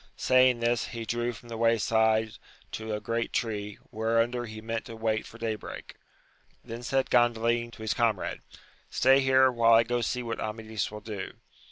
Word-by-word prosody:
Saying 130 -2 +4
this, 120 0 +1
he 115 -1 -6
drew 120 +2 -1
from 120 +1 -13
the 115 - -5
way 115 0 +3
side 110 0 +2 0.4
to 110 0 -5
a - - -3
great 115 +1 -2
tree, 105 -3 -3
whereunder 115 +2 0
he 110 -1 -8
meant 115 +1 -4
to 115 - -8
wait 110 -1 -1
for 115 - -13
day 115 -1 -2
break 105 - -9 0.7
Then 115 +1 -7
said 130 0 -1
Gandalin 120 -1 +2
to 110 - -10
his 110 - 0
comrade. 115 -5 0 0.5
Stay 135 +2 +4
here 130 -1 +4
while 115 -1 +4
I 115 0 +7
go 120 +1 -1
see 125 +2 -2
what 115 -1 -4
Amadis 110 -1 -3
will 105 0 -9
do. 105 -2 -6
115 Hz, 185 wpm, -28 LUFS, 110-120 Hz, 0.7 s, I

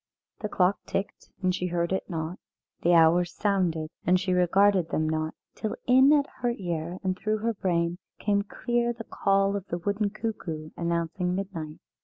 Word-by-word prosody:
The 210 - -3
clock 185 +1 +2
ticked, 195 - -4
and 185 0 +3
she 180 0 -1
heard 170 0 -1
it 190 - -2
not; 165 +1 -4 0.4
the 175 - +4
hours 170 +2 +4
sounded, 175 -6 0
and 180 +1 +4
she 185 0 0
regarded 180 0 +4
them 155 0 0
not 155 0 -1 0.2
till 215 - -3
in 260 +3 +6
at 290 -2 +5
her 240 -1 0
ear 170 -2 -3
and 185 -1 0
through 215 +3 -1
her 230 +2 -1
brain 175 -3 0 0.2
came 200 -1 +1
clear 240 +3 -1
the 230 -1 -8
call 195 -1 +1
of 200 -1 -4
the 175 - -2
wooden 205 +3 0
cuckoo 185 -8 -5
announcing 170 +2 -1
midnight. 165 -6 -5
185 Hz, 175 wpm, -27 LUFS, 170-205 Hz, 0.4 s, in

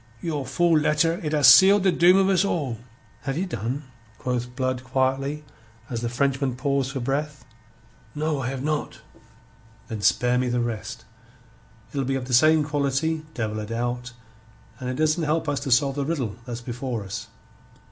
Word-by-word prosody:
Your 150 -5 -3
fool 170 +1 +3
letter 155 +3 +1
it 150 - -2
have 150 -2 +3
seal' 195 +2 +9
the 190 -1 +3
doom 180 +2 +5
of 195 -1 +4
us 195 -1 +3
all." 145 - -2 0.4
"Have 135 +2 -3
ye 185 - 0
done?" 125 - -4 0.3
quoth 125 -1 -3
Blood 130 -1 -1
quietly, 135 +3 -1 0.5
as 115 -1 -3
the 120 - -2
Frenchman 135 +1 0
paused 135 0 -1
for 135 - -4
breath. 140 +1 -3 0.7
"No, 150 -1 -1
I 120 - -2
have 135 0 -4
not." 150 0 -3 0.9
"Then 110 -2 -5
spare 125 +5 +3
me 125 -1 0
the 120 0 0
rest. 115 -1 -4 0.9
It'll 140 -1 -1
be 135 +1 -1
of 130 -2 -3
the 125 - -5
same 155 +5 +5
quality, 145 +2 -1
devil 110 -2 -2
a 105 - -4
doubt, 120 +2 -3 0.7
and 125 -1 -4
it 130 - -2
doesn't 155 +3 +1
help 160 +1 0
us 145 -1 0
to 140 -1 -4
solve 135 +3 +4
the 140 - 0
riddle 135 -10 -2
that's 120 -1 -5
before 120 -2 -4
us." 100 0 -6
135 Hz, 180 wpm, -24 LUFS, 125-150 Hz, 0.9 s, seal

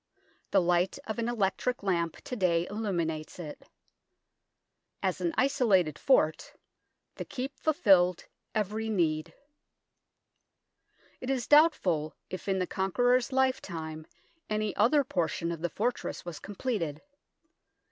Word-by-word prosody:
The 195 - +4
light 175 +1 +2
of 220 0 -4
an 230 +1 0
electric 225 +2 -1
lamp 170 -4 0
to 250 - -5
day 175 -5 +2
illuminates 175 -7 -3
it. 155 -4 -9 1.3
As - - 0
an 340 - +1
isolated 220 - +2
fort, 160 - +2 0.6
the - - -3
Keep 270 +2 -6
fulfilled 190 - +3 0.3
every 215 +1 -1
need. 160 -7 0 1.9
It 255 - -6
is 260 -3 0
doubtful 185 - +4 0.2
if 185 - -6
in 195 -1 +1
the 185 - 0
Conqueror's 245 +8 +1
lifetime 170 -13 -1 0.4
any 215 -1 -1
other 280 +7 +4
portion 170 - -1
of 165 -2 -5
the 175 - -1
fortress 235 +3 -2
was 170 -4 -6
com 205 - -9
pleted. 185 - -2
195 Hz, 120 wpm, -29 LUFS, 170-245 Hz, 1.9 s, The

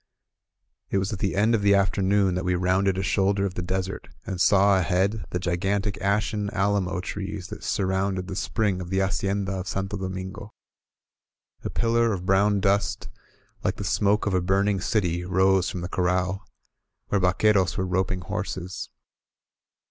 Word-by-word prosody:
•.. - - -51 0.9
It - - 0
was 95 +2 -1
at 100 - -5
the 95 - -1
end 110 +4 +3
of 110 - +2
the 100 0 +5
afternoon 95 0 +2
that 90 +1 -2
we 90 0 +1
rounded 95 +1 +1
a 95 - -1
shoulder 100 +1 +1
of 95 - -3
the 90 - -4
desert 95 +1 -3 0.2
and 90 -2 -3
saw 100 -1 +5
ahead 95 +5 0
the - - -2
gigantic 95 +4 -1
ashen 105 +1 0
alamo 95 -3 0
trees 95 -2 -5
that - - -8
surrounded 95 -1 -1
the 95 - -5
spring 100 -3 -1
of 85 - -7
the 95 - -1
Hacienda 95 0 0
of 95 -1 -4
Santo 95 +1 -3
Domingo. 95 +2 -6 1.1
A - - -3
pillar 115 -1 +2
of 90 -2 -5
brown 100 +2 +3
dust, 100 +4 0 0.5
like - - 0
the - - -6
smoke 105 +1 +1
of 105 - 0
a 90 - +2
burning 95 +2 +1
city, 90 -5 0
rose 95 +1 +2
from 90 - -5
the 90 - -3
corral, 95 +2 -1 0.6
where 100 - +1
vaqtieros 95 +1 +2
were 95 - 0
roping 95 0 -1
horses. 95 -1 -5
95 Hz, 170 wpm, -25 LUFS, 95-100 Hz, 1.1 s, the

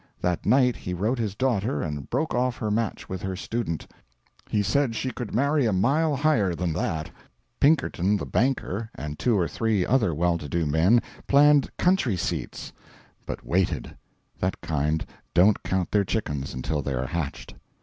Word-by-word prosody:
That 90 -1 -1
night 125 +2 +4
he 90 - -4
wrote 110 +8 0
his 105 -4 -2
daughter 120 0 0
and 75 -3 -5
broke 155 +6 -1
off 125 0 0
her 110 -3 -2
match 110 0 -2
with 95 -1 -5
her 95 -1 -3
student. 100 -4 -3 0.6
He 105 -1 +1
said 115 +3 +1
she 130 +3 -2
could 120 -5 -6
marry 140 +1 +2
a - - +2
mile 140 - +2
higher 125 - +2
than 85 -2 -1
that. 80 0 -2 0.5
Pinkerton 105 - +3
the - - -4
banker 115 -4 -1
and 75 0 -6
two 120 -4 +2
or 90 -3 +1
three 110 -5 0
other 120 -8 +2
well 85 +2 +1
to 75 - -7
do 85 +2 0
men 85 +11 +4 0.2
planned 145 0 +5
country 180 - +2
seats - - -4 0.5
but - - -5
waited. 85 -8 0 0.4
That - - -1
kind 75 +1 -1 0.3
don't 95 +4 +5
count 95 -2 -1
their 105 -1 +3
chickens 75 - -3
until 75 +4 -2
they 70 -1 -2
are 65 +1 -1
hatched. 80 -1 -4
105 Hz, 170 wpm, -26 LUFS, 85-125 Hz, 0.6 s, planned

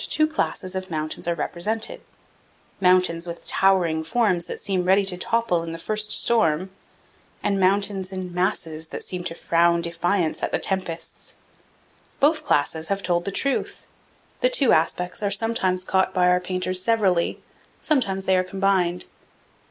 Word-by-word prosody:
389 - - -1
two 315 - -15
classes 185 -10 -2
of 190 0 -5
mountains 155 0 -4
are 170 - +1
represented: 220 +8 -3 0.8
mountains 180 -2 +2
with 170 0 -7
towering 175 -5 +2
forms 180 -1 +1
that - - -6
seem 190 -3 -1
ready 190 +2 +3
to 190 -2 -1
topple 200 -2 0
in 165 0 -6
the - - -5
first 215 +5 -2
storm, 190 -7 +2 0.7
and 200 -1 +1
mountains 195 0 +1
in 185 -2 -6
masses 165 -3 -2
that - - -7
seem 180 -1 -5
to 165 - -4
frown 170 0 +2
defiance 170 0 -1
at - - -2
the - - +1
tempests. 185 -4 -4 0.8
Both 305 +3 +3
classes 160 +2 0
have 200 0 -2
told 175 -1 0
the 200 - -2
truth. 275 +7 -2 0.5
The - - +3
two 285 - +3
aspects 180 +4 0
are 205 - 0
sometimes 195 -3 +1
caught 190 0 +1
by 180 -1 +4
our 180 0 +4
painters 185 0 -2
severally; 195 -5 +1 0.4
sometimes 200 -11 0
they 190 - +3
are 185 - +2
combined. 185 -2 0
185 Hz, 160 wpm, -23 LUFS, 170-200 Hz, 0.8 s, by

